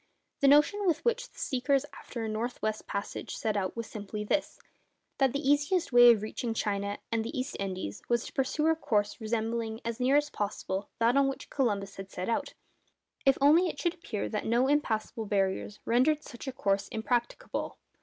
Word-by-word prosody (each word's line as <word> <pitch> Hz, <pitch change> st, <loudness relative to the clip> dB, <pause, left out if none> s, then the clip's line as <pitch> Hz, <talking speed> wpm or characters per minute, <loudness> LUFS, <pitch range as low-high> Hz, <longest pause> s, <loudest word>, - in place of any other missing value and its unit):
The 280 Hz, -, +4 dB
notion 300 Hz, +9 st, +5 dB
with 325 Hz, -2 st, +1 dB
which -, -, 0 dB
the -, -, -24 dB
seekers 275 Hz, +1 st, +1 dB
after 235 Hz, -3 st, -7 dB
a -, -, -2 dB
north 225 Hz, +3 st, -3 dB
west 215 Hz, 0 st, -2 dB
passage 200 Hz, 0 st, -4 dB
set 215 Hz, -1 st, -1 dB
out 190 Hz, -2 st, -1 dB
was 230 Hz, -, -3 dB
simply 210 Hz, 0 st, -6 dB
this, 290 Hz, +8 st, -1 dB, 0.6 s
that 270 Hz, -2 st, +4 dB
the 280 Hz, +1 st, -2 dB
easiest 290 Hz, +2 st, +2 dB
way 245 Hz, 0 st, +9 dB
of 215 Hz, -3 st, +1 dB
reaching 225 Hz, +1 st, -3 dB
China 200 Hz, -1 st, -1 dB
and 225 Hz, -1 st, +1 dB
the 255 Hz, +4 st, -4 dB
East 255 Hz, +2 st, -3 dB
Indies 185 Hz, -, -4 dB
was 235 Hz, 0 st, +1 dB
to -, -, -9 dB
pursue 270 Hz, +3 st, 0 dB
a 320 Hz, 0 st, +4 dB
course 210 Hz, -7 st, 0 dB
resembling 225 Hz, 0 st, -2 dB
as 230 Hz, +1 st, -3 dB
near 255 Hz, +3 st, +3 dB
as 295 Hz, 0 st, 0 dB
possible 200 Hz, -1 st, -3 dB
that 235 Hz, +2 st, +3 dB
on 275 Hz, 0 st, +4 dB
which 270 Hz, -, -5 dB
Columbus 205 Hz, -7 st, -1 dB
had 195 Hz, 0 st, -7 dB
set 185 Hz, +1 st, -4 dB
out—if 270 Hz, +3 st, -3 dB
only 310 Hz, +6 st, +6 dB
it -, -, -5 dB
should 345 Hz, -2 st, +1 dB
appear 240 Hz, -, -4 dB
that 210 Hz, -, -3 dB
no 240 Hz, +3 st, +3 dB
impassable 225 Hz, -6 st, 0 dB
barriers 200 Hz, +1 st, -1 dB
rendered 290 Hz, +6 st, +3 dB
such 240 Hz, +3 st, -10 dB
a -, -, -1 dB
course 200 Hz, -5 st, 0 dB
impracticable. 240 Hz, -, -2 dB
235 Hz, 190 wpm, -30 LUFS, 210-280 Hz, 0.6 s, way